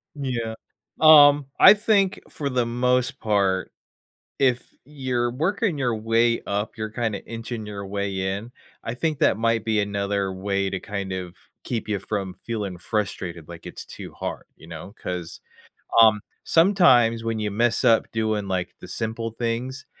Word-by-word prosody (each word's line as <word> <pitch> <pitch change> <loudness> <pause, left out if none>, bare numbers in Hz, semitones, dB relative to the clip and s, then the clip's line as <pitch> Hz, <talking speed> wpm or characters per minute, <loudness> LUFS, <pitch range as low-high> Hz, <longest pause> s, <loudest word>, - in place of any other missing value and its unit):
Yeah. 120 -5 -3 0.5
Um, 145 -3 +8
I - - +10
think 200 -2 +2
for 140 -2 -4
the 125 -3 0
most 125 +3 0
part, 100 -4 0 0.7
if 125 -3 +2 0.2
you're 130 -4 -2
working 170 - 0
your 120 -3 0
way 115 +2 +2
up, 100 +3 -3
you're 110 -1 -4
kinda 110 -3 -3
inching 115 -1 -6
your 100 -1 -6
way 100 -1 -3 0.2
in, 115 +5 -9 0.3
I 115 - -3
think 155 +2 -1
that - - +3
might 115 -1 0
be 110 -2 +1
another 100 -1 -1
way 100 0 -1
to 95 - -2
kind 100 -2 -5
of 90 -1 -5 0.3
keep 115 -3 -3
ya 105 -2 0
from 95 -1 -4
feeling 105 -6 -5
frustrated, 90 -5 -4
like, 85 -1 -11
it's - - -8
too - - -10
hard, - - -6
you 80 - -15
know? 85 +5 -9
'Cause, 90 -2 -6 0.6
um, 110 -2 +6 0.2
sometimes 130 - +4
when 115 -1 -2
you 105 -1 -2
mess 115 +2 +1
up 115 -1 +3
doing, 110 -2 -1
like, 90 -1 -2
the - - -11
simple 115 0 -4
things, 120 +4 -3
115 Hz, 160 wpm, -24 LUFS, 100-125 Hz, 0.7 s, I